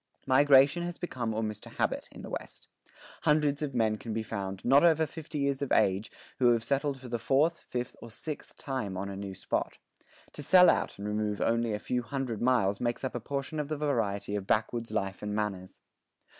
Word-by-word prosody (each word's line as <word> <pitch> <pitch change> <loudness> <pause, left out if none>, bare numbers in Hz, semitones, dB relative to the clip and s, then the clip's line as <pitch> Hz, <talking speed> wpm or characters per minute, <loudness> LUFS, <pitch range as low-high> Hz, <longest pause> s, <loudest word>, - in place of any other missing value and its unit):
Migration 140 +3 +5
has 175 0 -4
become 125 -10 -3
almost 110 -1 -3
a - - -13
habit - - -1
in - - -11
the - - -7
West. - - -6 0.5
Hundreds 150 -1 +2
of 140 -4 -3
men 110 -2 +2
can 110 +1 -6
be 110 - -1
found, 95 -3 -5
not 135 +5 +6
over 160 -2 +5
50 155 0 -7
years 140 -1 0
of 140 - -2
age, 95 +3 +2 0.3
who 120 -2 +6
have 115 -1 0
settled 140 +2 0
for 130 - -10
the 120 -1 -2
fourth, 150 +8 +2
fifth, 125 -1 -5
or 115 - -9
sixth 150 +6 -7
time 125 -9 -3
on 100 +1 -3
a 100 - -5
new 100 -1 -6
spot. - - -2 0.6
To - - -8
sell 180 +5 +7
out - - -2
and 100 +1 -5
remove 105 -1 -1
only 115 0 +1
a 105 - 0
few 125 +3 -2
hundred 120 -2 -3
miles 115 -6 +2
makes 120 +1 -1
up 130 - -2
a 125 - -2
portion 140 +5 -4
of 150 - -2
the 155 0 -3
variety 105 -9 -1
of 100 -2 -4
backwoods 115 +2 0
life 100 -3 -2
and 105 0 -3
manners. 100 -3 -3
120 Hz, 210 wpm, -30 LUFS, 105-140 Hz, 0.6 s, sell